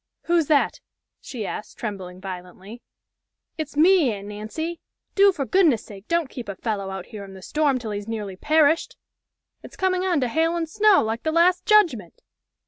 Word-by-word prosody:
"Who's 335 -3 +2
that?" 295 -3 +2 0.4
she 235 -6 -6
asked, 210 - -7
trembling 190 -5 -6
violently. 185 +4 -9 0.8
"It's 300 -2 -5
me, 335 -4 +5
Aunt 200 -1 -7
Nancy! 270 +12 -5 0.3
Do 400 0 +6
for 285 -7 -3
goodness' 310 - +3
sake 200 0 -12
don't 335 -3 +1
keep 245 -5 -8
a 200 - -4
fellow 200 -2 -3
out 190 -1 -6
here 215 -3 -9
in 195 -1 -11
the 190 - -12
storm 295 - +1
till 230 -3 -6
he's 205 0 -5
nearly 210 -4 -5
perished. 315 - +2 0.6
It's - - -12
coming 370 -1 +1
on 360 -5 +1
to 250 - +1
hail 325 +7 +1
and 335 -1 -2
snow 415 +4 +4
like 225 +1 -3
the 315 - -1
last 355 +3 +3
judgment!" 330 - +2
260 Hz, 180 wpm, -23 LUFS, 205-335 Hz, 0.8 s, Do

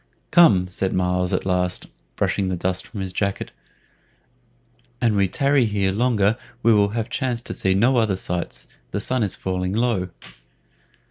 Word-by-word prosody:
"Come," 110 - +6
said 95 +1 -2
Myles 90 0 0
at - - -1
last, 90 -1 0 0.3
brushing 100 -2 0
the 95 - -1
dust 90 +1 -2
from 105 - -7
his 95 -1 -4
jacket, 100 +1 -2 1.5
"an 115 -3 +2
we 100 -1 +3
tarry 140 +5 +2
here 100 -3 0
longer 110 -1 +2 0.3
we 115 - +5
will 100 -1 +4
have 115 -1 -1
chance 125 -3 -2
to - - -5
see 95 0 +1
no 120 +6 +3
other 110 -4 +2
sights; 90 -2 -3 0.2
the 100 - -3
sun 130 +4 0
is 100 -4 0
falling 90 0 -2
low." 110 -5 0
100 Hz, 160 wpm, -22 LUFS, 95-115 Hz, 1.5 s, Come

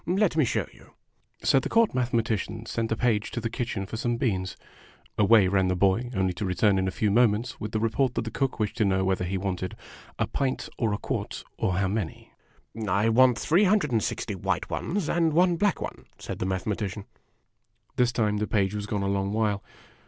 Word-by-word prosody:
Let 185 0 +2
me 155 -4 +4
show - - 0
you." - - -20 0.5
So 135 - +4
the - - -4
Court 230 -1 +3
Mathematician 115 -3 -1
sent 115 0 -2
a - - +2
page 115 -3 +1
to - - -4
the 115 -1 -3
kitchen 115 -5 -3
for 110 - -6
some 120 +1 -1
beans. 95 -7 -1 0.6
Away 105 -1 +5
ran 95 0 +2
the 90 - +1
boy; 100 +6 +2
only 95 -1 +1
to 85 - -5
return 95 +1 +2
in 95 - 0
a 95 - -4
few 105 -2 +2
moments 115 +1 +2
with 105 - -5
the 110 - 0
report 115 +3 +1
that - - 0
the 115 - -5
cook 135 -3 -1
wished 105 0 -1
to 110 - +3
know 95 -1 +1
whether 95 -1 0
he 95 +2 -2
wanted 95 -1 -3 0.2
" - - -21
a - - +1
pint, 135 -2 -2
or 115 -3 +1
a 100 - 0
quart, - - -4
or 95 - 0
how 95 +1 +1
many? 100 -4 -4 0.2
" - - -33 0.2
" 110 -2 -4 0.2
I 115 - +3
want 125 +1 +5
three 170 - +3
hundred 190 -7 +2
and 115 -2 +2
sixty - - -3
white - - -2
ones, 185 -2 -2
and 165 -1 +2
one 175 +2 +4
black 205 +3 +1
one," - - -6
said - - -6
the 90 - -1
Mathematician. 100 +1 -3 0.9
This 125 -1 +3
time 110 -3 0
the 105 +1 -1
page 100 -2 +1
was 105 -1 -4
gone 105 -1 -1
a - - 0
long 100 0 0
while. 105 -2 0
110 Hz, 225 wpm, -27 LUFS, 100-125 Hz, 0.9 s, Away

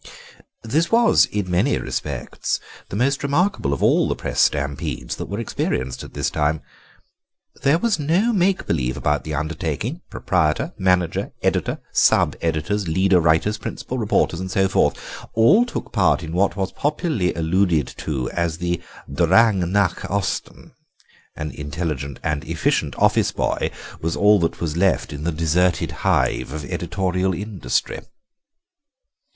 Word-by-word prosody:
This 150 +9 0
was, 235 0 +5
in 100 -3 -3
many 100 +11 +2
respects, - - -3 0.3
the - - -5
most 135 +6 +1
remarkable 145 - +1
of 70 - -1
all - - +4
the - - 0
Press - - -4
stampedes 70 -4 -1
that - - -5
were 100 - -4
experienced 65 - -2
at - - -12
this - - -1
time. 75 0 0 1.0
There 140 +4 +4
was 215 -1 0
no 175 +11 +2
make 190 -1 +2
believe 65 -5 -1
about 75 0 0
the 75 -1 -4
undertaking; 75 +2 -3
proprietor, 75 0 0
manager, 90 -2 0
editor, - - 0
sub - - +3
editors, 85 +5 -1
leader 95 +3 +3
writers, 80 +6 +2
principal - - -5
reporters, 85 - +1
and 95 0 -4
so 95 +1 +2
forth, 95 - +2 0.4
all 200 - +5
took - - -5
part 95 -4 +2
in 80 0 -6
what 95 +1 +2
was 95 -1 -2
popularly 145 - -1
alluded 85 -2 +2
to 65 -5 -3
as 85 -2 -1
the 85 0 -2 0.3
Drang 90 +5 +3
nach 100 -3 +1
Osten; 100 0 -3 0.6
an 75 -1 -4
intelligent 75 -3 -4
and 75 -2 -1
efficient - - 0
office - - +3
boy - - -1 0.3
was 80 +1 -1
all 105 0 +5
that 85 - -1
was 80 -2 -2
left 95 -2 +1
in 75 +2 -6
the 85 - +1
deserted 85 +3 +1
hive - - +1
of 75 -1 -5
editorial 95 -1 -1
industry." 95 - -2
90 Hz, 145 wpm, -22 LUFS, 80-105 Hz, 1.0 s, was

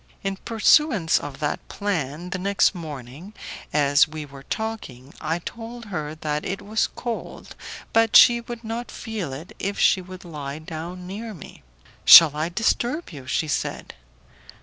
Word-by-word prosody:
In 195 0 -2
pursuance 225 - +3
of 145 -2 -8
that 145 - -2
plan, 175 -4 -3
the 185 - -3
next 200 +1 +2
morning, 155 - -9 0.4
as 145 0 +4
we 155 -1 -7
were 140 -1 -12
talking, 145 - -6
I 160 +2 -1
told 230 +6 -8
her 155 -2 -4
that 150 -1 -3
it 195 - -4
was 215 +2 0
cold, 235 -2 -6 0.4
but 225 -1 +3
that - - +1
she 235 0 +8
would 235 0 -8
not 230 +2 -5
feel 215 - -5
it 145 +6 -9
if 200 +1 -3
she 190 - +4
would 185 0 -11
lie 145 -4 -6
down 165 +3 -7
near 210 +4 -7
me. 160 - -13 0.4
"Shall 155 -3 +10
I 155 +2 -1
disturb 240 - -1
you?" 135 -5 -10
she 155 +4 0
said. 150 - -3
175 Hz, 160 wpm, -23 LUFS, 150-220 Hz, 0.4 s, Shall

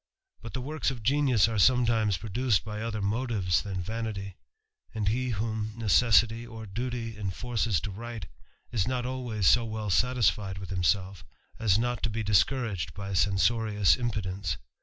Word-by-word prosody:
* 385 0 -40
But - - -9
the 130 - -3
works 150 +3 -1
of 125 -4 -6
genius 130 -4 +3
are 110 -2 -1
sometimes 115 -4 +3
produced 110 0 0
by 105 0 -5
other 110 -2 -3
motives 105 -4 0
than 95 -3 -4
vanity; 105 -2 -4 0.6
and 105 -2 -2
he 125 +4 0
whom 110 -1 -2
necessity 115 0 +3
or 115 -2 -9
duty 115 +2 -4
enforces 105 0 -1
to 100 - -4
write, 115 +3 -7 0.5
is 105 -6 0
not 125 -1 -1
always 125 -6 -3
so 120 +5 +6
well 110 -2 -3
satisfied 105 -4 +1
with 95 -1 -8
him 90 -2 -1
self, 95 +2 0 0.4
as 105 -4 +3
not 120 +1 -1
to 115 - 0
be 110 +1 -3
discouraged 105 - +1
by 100 -1 -5
censorious 105 +2 +3
impudence. 100 -5 -3
110 Hz, 160 wpm, -28 LUFS, 100-120 Hz, 0.6 s, so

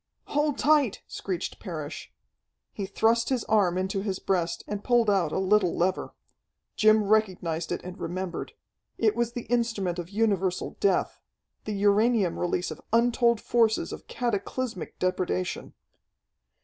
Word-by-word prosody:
"Hold 295 -1 +1
tight!" 290 -8 +3
screeched 185 -2 -4
Parrish. 160 -7 -6 0.6
He 195 - -4
thrust 230 +3 +2
his 255 -4 0
arm 190 -5 +2
into 190 +1 -1
his 195 -2 -2
breast, 175 -4 -1
and 205 -1 -4
pulled 235 -3 +3
out 180 -6 +1
a - - -1
little 190 -1 +2
lever. 185 +2 -1 0.6
Jim 215 0 +5
recognized 185 -6 0
it - - -3
and 180 0 -8
remembered. 185 +1 -4 0.4
It 220 -2 +2
was 235 0 -1
the 240 -2 -4
instrument 225 -7 0
of 175 0 -6
universal 195 -3 0
death 195 -2 +1 0.4
the 215 - -3
uranium 205 -1 +2
release 175 +1 -1
of - - -8
untold 235 0 +3
forces 225 -2 +1
of - - -10
cataclysmic 235 -2 -3
depredation. 180 - -2
205 Hz, 135 wpm, -27 LUFS, 185-230 Hz, 0.6 s, Jim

